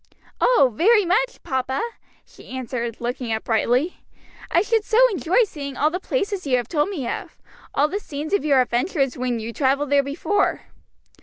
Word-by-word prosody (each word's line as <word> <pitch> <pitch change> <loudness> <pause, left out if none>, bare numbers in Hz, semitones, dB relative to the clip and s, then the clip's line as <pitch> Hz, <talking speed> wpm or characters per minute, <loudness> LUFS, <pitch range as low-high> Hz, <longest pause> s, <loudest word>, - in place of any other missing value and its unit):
"Oh, 280 - +4
very 420 - +4
much, 475 +8 0
papa!" 265 -3 -2 0.5
she - - -17
answered, 240 -3 -4
looking 240 0 -3
up 220 0 -1
brightly; 245 +8 +1 0.5
"I 345 - +3
should 445 0 +1
so 445 0 0
enjoy 370 - +2
seeing 280 - -6
all 300 +2 +2
the 360 - -2
places 400 -5 -2
you 255 -2 +3
have 240 -2 -3
told 300 +2 0
me 295 -12 -4
of, - - -5 0.4
all 290 +2 +4
the 395 +6 -3
scenes 305 -1 -6
of 405 - +2
your 280 -4 +4
adventures 265 +2 0
when 250 -2 -2
you 225 +1 -6
travelled 280 +2 +1
there 285 0 +5
before." 320 +8 0
285 Hz, 175 wpm, -22 LUFS, 255-375 Hz, 0.5 s, there